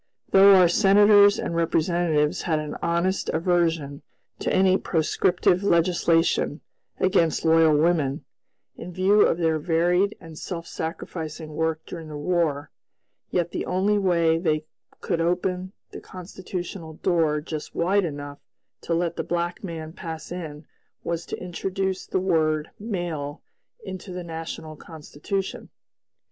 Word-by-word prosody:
Though 195 0 +8
our 180 -2 +7
senators 205 +2 +6
and 170 - -3
representatives 165 -1 +1
had 160 -3 0
an 150 -1 -4
honest 170 +3 0
aversion 165 -4 0 0.4
to - - -1
any 185 0 +4
proscriptive 175 +1 +1
legislation 170 -4 +2 0.4
against 175 -5 +2
loyal 160 -2 +5
women, 155 -3 +1 0.5
in 180 - -8
view 190 +4 +3
of - - +3
their 160 -2 +1
varied 175 +5 +1
and 165 -2 -11
self 170 -3 -5
sacrificing 160 -1 -6
work 160 0 -1
during 165 -1 -8
the 150 -1 -7
War, 150 -2 -1 0.6
yet 175 -1 -1
the - - -4
only 200 +3 +1
way 170 -4 +2
they 155 -3 0 0.4
could 165 - -1
open 180 +2 -1 0.2
the - - -9
constitutional 180 -2 -7
door 160 -3 +1
just 155 0 -7
wide 195 +4 +2
enough 145 -3 -6 0.4
to 170 - -1
let 170 0 -1
the - - -1
black 175 +2 -3
man 160 -3 -6
pass 165 -3 -7
in 155 -4 -7 0.4
was 170 0 -3
to - - -4
introduce 190 +1 -3
the - - 0
word 155 -4 +1
"male" 175 -9 -4 0.4
into 185 +1 -7
the 180 0 -5
national 160 -1 -7
Constitution. 160 +5 -6
170 Hz, 130 wpm, -24 LUFS, 160-185 Hz, 0.6 s, Though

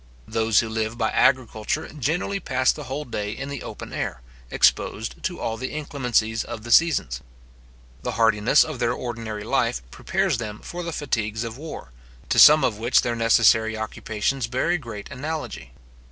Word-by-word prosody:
Those 110 -1 +2
who 115 - -4
live 110 +1 -2
by - - 0
agriculture 115 -4 +1
generally 160 +7 -2
pass 130 -7 +2
the 150 - -7
whole 135 +4 -4
day 105 -3 -3
in 135 +4 -6
the 140 -2 -5
open - - -8
air, - - -3 0.3
exposed - - +1
to - - -3
all 115 0 -2
the 130 +2 -4
inclemencies 125 -7 0
of 110 - -7
the 120 - -6
seasons. 115 - +3 0.8
The - - -3
hardiness 115 +4 +4
of 155 -5 -6
their 120 -1 +1
ordinary 115 -4 -5
life 60 - 0
prepares - - -1
them 105 -2 -6
for 175 - -6
the 170 -1 -4
fatigues 110 -7 -2
of 115 -1 -5
war, 155 - -8 0.4
to - - +3
some 150 -1 +9
of 110 -5 0
which 120 +3 +3
their 120 -1 -1
necessary 110 -1 +4
occupations 110 +3 -2
bear 130 +8 0
a 175 - +1
great 115 -7 -8
analogy. 150 - -5
115 Hz, 170 wpm, -24 LUFS, 110-140 Hz, 0.8 s, some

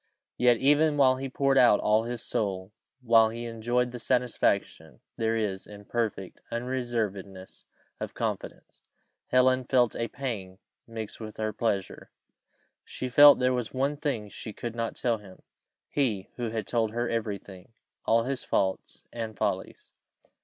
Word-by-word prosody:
Yet, 125 -1 +4
even 145 +4 +3
while 130 -2 +5
he 135 +1 -4
poured 135 +1 +2
out 120 -4 +6
all 110 +1 +2
his 120 -1 -4
soul 95 -2 -2 0.3
while 115 -2 +5
he 115 +1 -6
enjoyed 120 +2 -1
the 125 - -7
satisfaction 125 0 0 0.2
there 115 0 0
is 100 -4 -2
in 105 0 -12
perfect 110 -6 -3
unreservedness 115 -6 -4 0.3
of - - -6
confidence, - - -5 0.5
Helen 130 0 +3
felt 125 -3 +2
a 115 - -2
pang 110 -9 -5 0.3
mix 110 -2 -7
with 110 -1 -8
her 110 0 -2
pleasure. 100 -3 -2 0.7
She 130 - -5
felt 145 +3 +9
there 125 0 +2
was 125 0 -3
one 140 +3 +1
thing 140 -8 -2
she 110 +1 -8
could 120 +1 -5
not 115 -1 -3
tell 115 -3 0
him: 95 -3 -15 0.4
he 110 -10 -1
who 120 -2 -3
had 110 -2 -3
told 115 -2 0
her 120 +1 -1
every 110 -4 -2
thing 95 0 -14 0.3
all 115 +1 +3
his 135 +2 -3
faults, 95 -1 -1
and 110 -2 -5
follies. - - -3
115 Hz, 155 wpm, -28 LUFS, 105-125 Hz, 0.7 s, felt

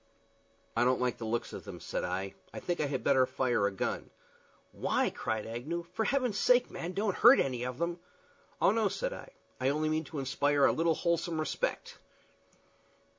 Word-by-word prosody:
"I 115 - +3
don't 125 +1 +3
like 125 -1 -1
the 115 - -4
looks 115 +1 -2
of - - -7
them," - - -8
said - - -3
I. 95 +2 -3 0.2
"I - - -6
think 175 -1 -2
I 150 - +1
had 135 -2 -3
better 130 -2 +4
fire 120 -6 +1
a - - -2
gun." 95 - -3 0.6
"Why?" - - 0
cried 110 -1 -3
Agnew. 135 +10 -4
"For 220 - 0
Heaven's 250 -5 +1
sake, 250 0 +4
man, 175 +2 -5
don't 200 0 -1
hurt 240 +4 +8
any 125 -3 0
of 125 0 -4
them!" 170 +2 -2 0.6
"Oh - - +5
no," 220 -1 +2
said - - -2
I; - - -9 0.3
"I 130 +1 +2
only 155 +2 0
mean 155 0 0
to 155 +2 -8
inspire 140 +1 +2
a - - +5
little 165 0 +2
wholesome 170 -1 0
respect." 485 - -2
155 Hz, 190 wpm, -31 LUFS, 125-180 Hz, 0.6 s, hurt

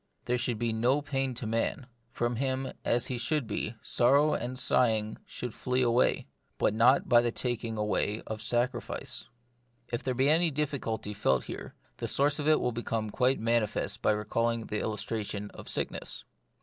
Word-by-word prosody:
There 125 0 0
should 120 -2 -1
be 115 0 0
no 125 +6 +2
pain 135 -3 -1
to 115 - -5
man: 115 +4 -1 0.2
from 120 -1 -1
him, 130 0 -1
as 120 0 +2
he 125 -2 -2
should 145 +3 0
be, 110 +1 -3
sorrow 140 +5 +4
and 125 +2 -3
sighing 110 -4 +2
should 125 -3 -6
flee 125 +1 0
away 120 +1 +2 0.2
— - - -44
but - - +2
not 120 +5 +4
by 120 -1 +6
the 120 0 0
taking 115 -2 -3
away 105 0 0
of 110 0 -5
sacrifice. 125 +3 -2 0.6
If 120 - -2
there 130 -1 -2
be 135 +2 +3
any 165 +3 +4
difficulty 135 -8 -2
felt 65 -10 +1
here, - - -7 0.2
the - - -3
source 145 +2 +1
of 145 - -1
it 155 0 +5
will 125 - 0
become 115 -2 -3
quite 130 +3 +2
manifest 115 -1 0
by - - +3
recalling 115 +2 -1
the 105 - -3
illustration 105 -1 -3
of - - -9
sickness. - - -3
120 Hz, 175 wpm, -30 LUFS, 110-130 Hz, 0.6 s, by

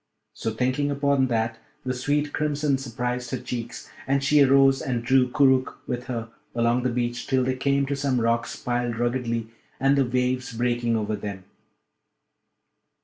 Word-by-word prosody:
So, - - -3
thinking 130 +6 0
upon 140 -1 +2
that, 115 -2 -1 0.3
the 130 - 0
sweet 145 +3 -1
crimson 150 -2 0
surprised 125 -1 -3
her 130 - -2
cheeks, 120 -1 -6 0.2
and 135 0 +1
she 145 +2 +4
arose 135 0 +5
and 120 -3 -2
drew 130 0 +4
Koorookh 130 -1 +3
with 125 0 -4
her 115 -3 -4 0.3
along 120 +1 +2
the 125 - 0
beach 120 0 -2
till 130 -1 +2
they 130 0 0
came 140 +1 +1
to 140 +1 -2
some 135 -2 0
rocks 115 0 0
piled 120 -1 -2
ruggedly 120 -2 -1 0.3
and 135 +1 +3
the 140 - +4
waves 125 0 -1
breaking 120 0 0
over 110 -1 -1
them. 100 -2 -6
125 Hz, 160 wpm, -25 LUFS, 120-135 Hz, 0.3 s, arose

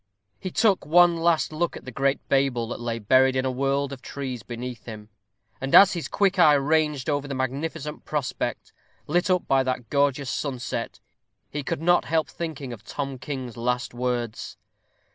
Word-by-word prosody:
He 185 - -4
took 200 +1 +2
one 175 +3 +5
last 165 -1 +1
look 170 +2 -1
at - - -13
the 130 - -7
great 135 +2 0
Babel 135 -4 +1
that - - -5
lay 120 -1 -3
buried 130 +4 +4
in 130 0 0
a 130 - 0
world 140 +1 0
of 130 - -9
trees 130 -4 -5
beneath 120 +2 -7
him; 105 -2 -9 0.5
and 135 +1 +1
as 195 -1 +9
his 170 -3 -3
quick 195 -2 +1
eye 150 -4 +7
ranged 150 -1 +1
over 145 -1 0
the 140 - -4
magnificent 150 +4 -3
prospect, 145 -4 -3 0.3
lit 175 +5 +1
up 180 -1 +1
by 135 0 +4
that 130 -2 -3
gorgeous 140 -1 +1
sunset, 130 -4 -4 0.5
he 150 - -3
could 140 +2 -3
not 175 +1 +4
help 160 -1 0
thinking 150 -7 -5
of 110 -2 -11
Tom 135 0 -5
King's 130 -5 -6
last 125 +2 -1
words. 120 -2 -3
140 Hz, 180 wpm, -25 LUFS, 125-155 Hz, 0.5 s, as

